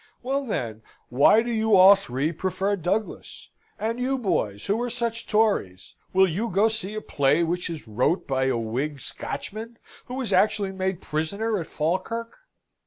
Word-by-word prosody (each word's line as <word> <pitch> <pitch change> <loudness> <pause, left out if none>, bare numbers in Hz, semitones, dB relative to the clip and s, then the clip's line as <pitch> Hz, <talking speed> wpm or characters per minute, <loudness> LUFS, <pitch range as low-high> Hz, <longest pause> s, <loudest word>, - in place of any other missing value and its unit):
"Well, 270 +1 -1
then, 115 - -3 0.3
why 145 - +5
do 240 - -3
you 220 -2 +3
all 190 +1 +9
three 150 -6 -2
prefer 190 +4 -1
Douglas? 195 +4 -3 0.3
And 230 +3 -2
you, 265 +2 0
boys, 105 - -1
who 210 +4 0
are 245 - -1
such 230 -1 -3
Tories, 200 - 0 0.2
will 190 +1 +5
you 200 +8 -2
go 205 +4 +3
see 215 -2 -2
a 215 - -3
play 145 +1 +2
which 175 +1 -1
is 160 -7 -7
wrote 125 - 0
by 130 -1 0
a 130 -2 +1
Whig 130 +6 -3
Scotchman, 225 - -6 0.3
who 250 - -7
was 260 -3 -2
actually 205 -2 +2
made 190 -1 -2
prisoner 200 +8 -2
at 165 - -5
Falkirk?" 190 +9 -2
195 Hz, 170 wpm, -25 LUFS, 150-225 Hz, 0.3 s, all